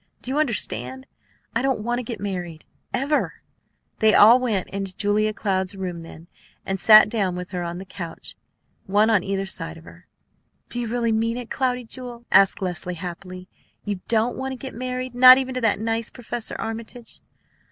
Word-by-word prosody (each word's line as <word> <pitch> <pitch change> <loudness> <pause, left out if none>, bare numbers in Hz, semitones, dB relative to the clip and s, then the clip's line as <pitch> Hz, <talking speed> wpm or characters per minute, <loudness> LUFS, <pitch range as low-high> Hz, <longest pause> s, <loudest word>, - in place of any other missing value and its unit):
Do 255 - -4
you 285 - 0
understand? 130 - -1 0.5
I 230 - +2
don't 265 -5 0
want 240 +2 -1
to - - -4
get 225 -2 -6
married, 180 -5 -5 0.3
ever!" 285 +3 0 0.6
They 220 -1 +5
all 230 +4 +8
went 220 -7 -1
into 195 -1 -5
Julia 210 +1 +1
Cloud's 190 -2 -2
room 180 -3 -5
then, 165 0 -12 0.4
and 195 0 -2
sat 215 +3 +8
down 200 -5 -1
with 180 0 -7
her 180 -2 -3
on 170 0 -4
her 190 - -8
couch, 175 -3 -8 0.5
one 210 +3 +3
on 205 -5 +3
either 195 0 -2
side 165 -3 -5
of 165 - -14
her. 175 +1 -16 0.6
"Do 245 - +4
you 235 - -3
really 235 0 0
mean 225 +2 0
it, 245 -2 -7
Cloudy 250 -2 -1
Jewel?" 240 0 -10
asked 195 0 +5
Leslie 180 0 -3
happily. 180 +1 -8 0.4
"You 205 -3 -3
don't 230 +1 +1
want 265 0 -3
to - - -5
get 260 +1 -8
married, 255 +1 -4
not 255 +1 +9
even 260 -1 -2
to 255 - -3
that 225 -3 +2
nice 225 +1 -1
Professor 240 -1 -5
Armitage?" 225 +1 -7
215 Hz, 185 wpm, -23 LUFS, 185-245 Hz, 0.6 s, not